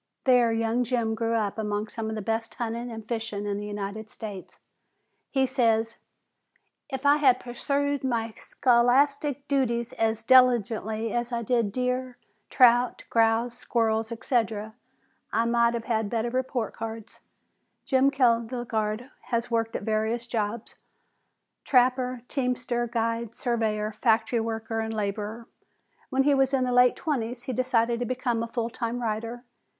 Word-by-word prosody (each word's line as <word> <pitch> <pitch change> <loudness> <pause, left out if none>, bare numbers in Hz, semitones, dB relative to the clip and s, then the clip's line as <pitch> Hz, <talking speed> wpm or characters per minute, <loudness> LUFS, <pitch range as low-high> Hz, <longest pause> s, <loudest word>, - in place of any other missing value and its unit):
There 250 -3 +4
young 225 +2 +1
Jim 235 -2 0
grew 230 +1 -1
up 215 -1 -1
among 210 0 -2
some 220 0 -4
of 220 - -3
the 215 - -4
best 225 +1 -2
hunting 235 +1 -3
and 220 -1 -8
fishing 225 -3 -3
in 200 -1 -2
the 210 - -5
United 205 +1 -5
States. 205 -5 -8 0.7
He 265 -1 +2
says: 230 -3 +1 0.9
"If 265 0 -5
I 285 +1 +6
had 260 -4 +4
pursued 280 +3 -1
my 230 -3 -1
scholastic 275 +3 +2
duties 235 -4 0
as 225 0 0
diligently 225 -3 +3
as 240 0 -1
I 235 -1 -2
did 230 -2 +1
deer, 250 +1 -2 0.3
trout, 245 -1 +4
grouse, 230 +1 +2
squirrels, 225 -2 0
etc., 225 -2 -1 0.6
I 230 - +1
might 235 0 +3
have 230 - -4
had 220 -3 0
better 235 +1 -1
report 255 -3 -2
cards!" 225 -1 -7 0.7
Jim 265 0 +4
Kjelgaard 235 -2 0
has 240 -1 -2
worked 225 -1 0
at - - -3
various 220 +2 -1
jobs 220 -1 -3 0.9
trapper, 250 -1 +2
teamster, 250 -2 -1
guide, 230 -1 -2
surveyor, 220 -3 -1
factory 225 +1 +1
worker 225 0 -3
and 220 0 -3
laborer. 210 +2 -3 0.6
When 270 -1 +2
he 290 +1 +4
was 270 0 +3
in 260 - +1
the 250 - 0
late 250 0 +5
twenties 245 -5 -3
he 255 - -4
decided 235 -1 +1
to 245 - -1
become 245 -2 -1
a 230 - -2
full 230 0 -3
time 235 +1 -3
writer. 230 +1 -3
235 Hz, 145 wpm, -26 LUFS, 225-250 Hz, 0.9 s, I